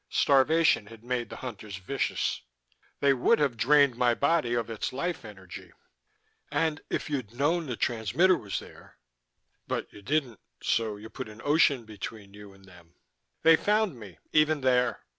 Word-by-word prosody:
Starvation 145 Hz, -4 st, +3 dB
had 115 Hz, 0 st, -13 dB
made 120 Hz, -1 st, -2 dB
the -, -, -8 dB
Hunters 110 Hz, -5 st, -7 dB
vicious. 95 Hz, -, -2 dB, 0.6 s
They 140 Hz, -1 st, +5 dB
would 125 Hz, -, +3 dB
have 140 Hz, -5 st, +1 dB
drained 140 Hz, +2 st, +4 dB
my 120 Hz, -1 st, +2 dB
body 140 Hz, -4 st, +1 dB
of 115 Hz, -2 st, -1 dB
its 115 Hz, -2 st, -4 dB
life 170 Hz, +5 st, -3 dB
energy." 95 Hz, -4 st, -11 dB, 0.8 s
"And 160 Hz, -2 st, 0 dB
if -, -, -2 dB
you'd 130 Hz, -7 st, -4 dB
known 160 Hz, +5 st, +1 dB
the 125 Hz, -, -3 dB
transmitter 120 Hz, -, +2 dB
was 100 Hz, -, -4 dB
there -, -, -12 dB, 0.7 s
but -, -, -4 dB
you 105 Hz, -, -12 dB
didn't. 130 Hz, -2 st, -1 dB, 0.2 s
So 110 Hz, -2 st, 0 dB
you 110 Hz, +2 st, -11 dB
put -, -, -7 dB
an 110 Hz, 0 st, -13 dB
ocean 145 Hz, -5 st, +3 dB
between 105 Hz, -1 st, -8 dB
you 105 Hz, -1 st, -12 dB
and 95 Hz, 0 st, -19 dB
them." 90 Hz, -2 st, -18 dB, 0.5 s
"They 165 Hz, 0 st, +8 dB
found 210 Hz, -, 0 dB
me 100 Hz, -5 st, -11 dB, 0.2 s
even 155 Hz, -1 st, +3 dB
there. 125 Hz, -1 st, +2 dB
125 Hz, 160 wpm, -28 LUFS, 110-150 Hz, 0.8 s, They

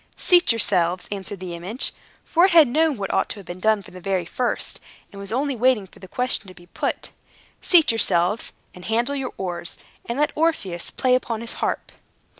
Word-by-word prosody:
"Seat 355 Hz, -5 st, +5 dB
yourselves," 185 Hz, -5 st, +1 dB
answered 200 Hz, -1 st, -4 dB
the 180 Hz, -2 st, -6 dB
image 185 Hz, +9 st, -2 dB, 0.3 s
(for 340 Hz, +2 st, +4 dB
it 385 Hz, -, +2 dB
had 320 Hz, -4 st, +8 dB
known 305 Hz, +2 st, +2 dB
what 195 Hz, -1 st, -3 dB
had -, -, +1 dB
ought -, -, -1 dB
to 200 Hz, -, -6 dB
be 175 Hz, -, -7 dB
done 210 Hz, +3 st, +1 dB
from -, -, -15 dB
the 185 Hz, -, -10 dB
very 190 Hz, -2 st, -1 dB
first, 245 Hz, +8 st, -2 dB, 0.3 s
and 200 Hz, -, -10 dB
was 200 Hz, -, 0 dB
only 270 Hz, +3 st, 0 dB
waiting 245 Hz, -3 st, +2 dB
for 185 Hz, -, -19 dB
the 190 Hz, -, -11 dB
question 250 Hz, -1 st, 0 dB
to 185 Hz, -, -12 dB
be 175 Hz, -, -16 dB
put), -, -, -4 dB, 0.5 s
"seat 335 Hz, -8 st, +5 dB
yourselves, 205 Hz, -1 st, +1 dB, 0.2 s
and 180 Hz, -, -12 dB
handle 235 Hz, +5 st, 0 dB
your 270 Hz, -2 st, -3 dB
oars, 175 Hz, -2 st, -5 dB, 0.3 s
and 235 Hz, -, -3 dB
let 295 Hz, +1 st, +2 dB
Orpheus 300 Hz, -, -1 dB
play 255 Hz, -1 st, +1 dB
upon 235 Hz, -3 st, 0 dB
his 235 Hz, -, -4 dB
harp." -, -, -3 dB
220 Hz, 205 wpm, -23 LUFS, 185-260 Hz, 0.5 s, had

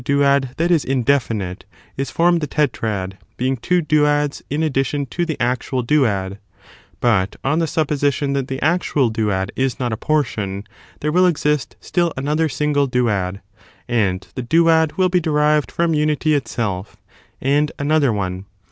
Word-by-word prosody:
duad 140 Hz, -1 st, +2 dB
that 170 Hz, +2 st, +1 dB
is 165 Hz, -4 st, +3 dB
indefinite, 120 Hz, -8 st, 0 dB, 0.3 s
is 135 Hz, +1 st, -3 dB
formed 170 Hz, 0 st, +2 dB
the 150 Hz, -, -2 dB
tetrad, 110 Hz, -10 st, -2 dB, 0.2 s
being 130 Hz, +2 st, 0 dB
two 175 Hz, +8 st, 0 dB
duads 150 Hz, -1 st, +1 dB
in 150 Hz, +3 st, -1 dB
addition 140 Hz, -1 st, 0 dB
to 175 Hz, +7 st, -3 dB
the 160 Hz, -, -3 dB
actual 125 Hz, +1 st, -1 dB
duad; 105 Hz, -9 st, +1 dB, 0.6 s
but, 105 Hz, -6 st, +1 dB
on 150 Hz, +4 st, +1 dB
the 165 Hz, -, +1 dB
supposition 145 Hz, -2 st, 0 dB
that 135 Hz, -2 st, -1 dB
the 130 Hz, -1 st, -4 dB
actual 150 Hz, -6 st, +1 dB
duad 105 Hz, -3 st, -1 dB
is 130 Hz, -2 st, -1 dB
not 120 Hz, -3 st, -1 dB
a -, -, -3 dB
portion, 105 Hz, -10 st, -1 dB, 0.4 s
there 150 Hz, -, 0 dB
will 180 Hz, +3 st, +4 dB
exist 150 Hz, -4 st, 0 dB
still 175 Hz, -2 st, 0 dB
another 150 Hz, +4 st, 0 dB
single 145 Hz, 0 st, +1 dB
duad, 105 Hz, -7 st, 0 dB, 0.5 s
and 100 Hz, -6 st, 0 dB
the -, -, -4 dB
duad 160 Hz, +3 st, +3 dB
will 185 Hz, -1 st, +4 dB
be 180 Hz, 0 st, +2 dB
derived 150 Hz, -2 st, +1 dB
from 170 Hz, -1 st, +1 dB
unity 150 Hz, 0 st, +1 dB
itself, 110 Hz, -9 st, -2 dB, 0.4 s
and 145 Hz, +3 st, +1 dB
another 145 Hz, -2 st, +2 dB
one. 95 Hz, -2 st, -3 dB
140 Hz, 155 wpm, -20 LUFS, 115-150 Hz, 0.6 s, will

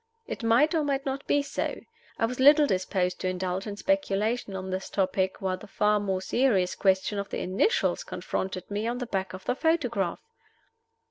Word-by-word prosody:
It -, -, -6 dB
might 240 Hz, +8 st, +4 dB
or 320 Hz, -2 st, +2 dB
might 280 Hz, -1 st, -1 dB
not 270 Hz, 0 st, -3 dB
be 285 Hz, -, +3 dB
so. 280 Hz, -, -3 dB, 0.4 s
I -, -, +2 dB
was 250 Hz, +2 st, -4 dB
little 290 Hz, +3 st, +7 dB
disposed 185 Hz, -4 st, 0 dB
to -, -, -2 dB
indulge 185 Hz, +2 st, -2 dB
in 205 Hz, -1 st, -5 dB
speculation 225 Hz, -6 st, 0 dB
on 190 Hz, 0 st, -5 dB
this 190 Hz, +1 st, -3 dB
topic 190 Hz, -1 st, 0 dB
while 185 Hz, -1 st, 0 dB
the 210 Hz, -, -12 dB
far 210 Hz, +1 st, +2 dB
more 190 Hz, -2 st, -2 dB
serious 200 Hz, -5 st, +2 dB
question 190 Hz, +1 st, +1 dB
of 200 Hz, -, -4 dB
the -, -, -3 dB
initials 320 Hz, -, +1 dB
confronted 190 Hz, -, -4 dB
me 210 Hz, +2 st, -1 dB
on 240 Hz, +1 st, -1 dB
the 250 Hz, -, -3 dB
back 195 Hz, -5 st, -3 dB
of 185 Hz, 0 st, -9 dB
the -, -, +1 dB
photograph. 250 Hz, -, 0 dB
205 Hz, 190 wpm, -27 LUFS, 190-265 Hz, 0.4 s, little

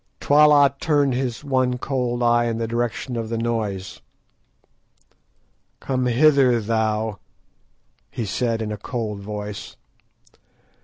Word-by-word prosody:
Twala 145 Hz, -1 st, +5 dB
turned 145 Hz, -5 st, +2 dB
his 125 Hz, 0 st, -3 dB
one 130 Hz, -3 st, 0 dB
cold 125 Hz, -2 st, -2 dB
eye 120 Hz, 0 st, +3 dB
in 115 Hz, -1 st, -1 dB
the 115 Hz, 0 st, -2 dB
direction 120 Hz, +2 st, -3 dB
of 115 Hz, -1 st, -4 dB
the 115 Hz, -, -2 dB
noise. 110 Hz, -5 st, -3 dB, 1.8 s
"Come 130 Hz, -1 st, -1 dB
hither, 130 Hz, -1 st, +4 dB
thou," 110 Hz, -1 st, -1 dB, 0.9 s
he 115 Hz, -, -4 dB
said, 115 Hz, +2 st, -1 dB
in 105 Hz, -, -4 dB
a 105 Hz, -, -4 dB
cold 105 Hz, -1 st, -4 dB
voice. 105 Hz, 0 st, -7 dB
120 Hz, 115 wpm, -22 LUFS, 110-130 Hz, 1.8 s, Twala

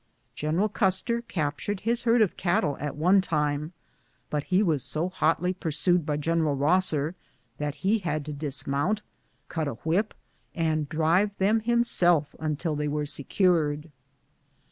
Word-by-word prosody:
General 160 Hz, +7 st, 0 dB
Custer 210 Hz, +3 st, +1 dB
captured 180 Hz, 0 st, -3 dB
his 235 Hz, +2 st, 0 dB
herd 230 Hz, -1 st, +5 dB
of 200 Hz, -, -2 dB
cattle 170 Hz, -5 st, 0 dB
at 145 Hz, 0 st, -4 dB
one 180 Hz, +6 st, +4 dB
time, 150 Hz, -3 st, -1 dB, 0.6 s
but 150 Hz, -1 st, -1 dB
he 185 Hz, +2 st, +2 dB
was 160 Hz, -8 st, +1 dB
so 165 Hz, +8 st, -2 dB
hotlj 180 Hz, +2 st, 0 dB
pursued 165 Hz, +1 st, +1 dB
by 150 Hz, -1 st, 0 dB
General 155 Hz, -1 st, 0 dB
liosser 155 Hz, 0 st, +2 dB, 0.5 s
that 150 Hz, -1 st, -2 dB
he 215 Hz, +3 st, +3 dB
had 155 Hz, -6 st, -3 dB
to 150 Hz, -, -5 dB
dismount, 145 Hz, +7 st, -1 dB, 0.4 s
cut 160 Hz, -3 st, -3 dB
a 140 Hz, -, -4 dB
whip, 185 Hz, +7 st, 0 dB, 0.4 s
and 155 Hz, -3 st, 0 dB
drive 170 Hz, +6 st, +1 dB
them 210 Hz, +4 st, +3 dB
himself 185 Hz, -10 st, +3 dB
until 155 Hz, +1 st, -2 dB
they 150 Hz, 0 st, -2 dB
were 150 Hz, 0 st, -1 dB
secured. 155 Hz, 0 st, 0 dB
165 Hz, 145 wpm, -26 LUFS, 150-190 Hz, 0.6 s, herd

